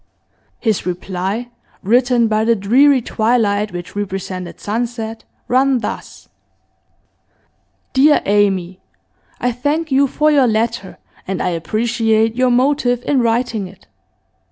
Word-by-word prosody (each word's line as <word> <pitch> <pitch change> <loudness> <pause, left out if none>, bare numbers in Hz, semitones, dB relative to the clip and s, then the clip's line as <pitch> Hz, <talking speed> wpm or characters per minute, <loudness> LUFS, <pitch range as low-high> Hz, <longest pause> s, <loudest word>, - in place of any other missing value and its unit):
His 220 -4 0
reply, 190 +6 -4 0.3
written 240 +2 +3
by 215 0 +1
the 230 +1 +3
dreary 255 +6 +3
twilight 215 -3 0
which 175 +1 -8
represented 190 -3 -5
sunset, 225 0 -4 0.2
ran 265 +1 +3
thus. 235 - -6 1.7
'Dear 290 +3 +4
Amy, 195 -3 +1 0.6
I 245 - 0
thank 290 +6 -2
you 275 +1 +4
for 305 +3 +1
your 275 -4 +4
letter, 225 -2 -2 0.3
and 190 -1 -3
I - - 0
appreciate 225 +5 0
your 255 0 +2
motive 250 -1 +1
in 275 -3 +2
writing 230 -3 0
it. 185 0 -17
230 Hz, 115 wpm, -17 LUFS, 200-250 Hz, 1.7 s, Dear